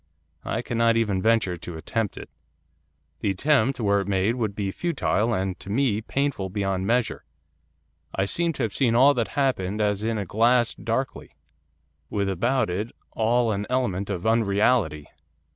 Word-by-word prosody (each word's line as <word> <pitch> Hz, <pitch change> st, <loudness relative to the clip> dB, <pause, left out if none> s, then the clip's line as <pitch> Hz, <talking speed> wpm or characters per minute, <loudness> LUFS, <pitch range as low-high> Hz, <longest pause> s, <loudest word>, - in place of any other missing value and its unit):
I -, -, -2 dB
cannot 115 Hz, -1 st, +2 dB
even 105 Hz, -5 st, +1 dB
venture 110 Hz, -4 st, +2 dB
to 85 Hz, 0 st, -8 dB
attempt 110 Hz, +5 st, -2 dB
it. -, -, -8 dB, 0.9 s
The 105 Hz, -, -1 dB
attempt, 135 Hz, +5 st, +2 dB
were 100 Hz, -2 st, +2 dB
it 100 Hz, -, -6 dB
made, 100 Hz, +3 st, +1 dB
would 110 Hz, -5 st, -2 dB
be 100 Hz, -2 st, -2 dB
futile, 125 Hz, -, 0 dB
and, 95 Hz, -3 st, -2 dB
to 95 Hz, -, -10 dB
me, 110 Hz, -1 st, +1 dB
painful 135 Hz, -5 st, -2 dB
beyond 95 Hz, -1 st, -1 dB
measure. 120 Hz, -2 st, 0 dB, 0.9 s
I 95 Hz, -, +1 dB
seem 170 Hz, +11 st, 0 dB
to 135 Hz, -, -3 dB
have 110 Hz, -, -2 dB
seen 120 Hz, -4 st, +2 dB
all 135 Hz, +4 st, +6 dB
that 120 Hz, -4 st, 0 dB
happened 110 Hz, -8 st, 0 dB
as 105 Hz, -1 st, +1 dB
in 110 Hz, 0 st, -1 dB
a 100 Hz, -, -2 dB
glass 115 Hz, +5 st, +3 dB
darkly, 115 Hz, +3 st, -4 dB, 0.7 s
with 100 Hz, -1 st, -1 dB
about 120 Hz, +8 st, +1 dB
it 105 Hz, +6 st, -3 dB, 0.2 s
all 115 Hz, +1 st, +2 dB
an 105 Hz, 0 st, -2 dB
element 110 Hz, -7 st, -1 dB
of 90 Hz, -2 st, -3 dB
unreality. 105 Hz, -6 st, +2 dB
110 Hz, 160 wpm, -25 LUFS, 100-120 Hz, 0.9 s, all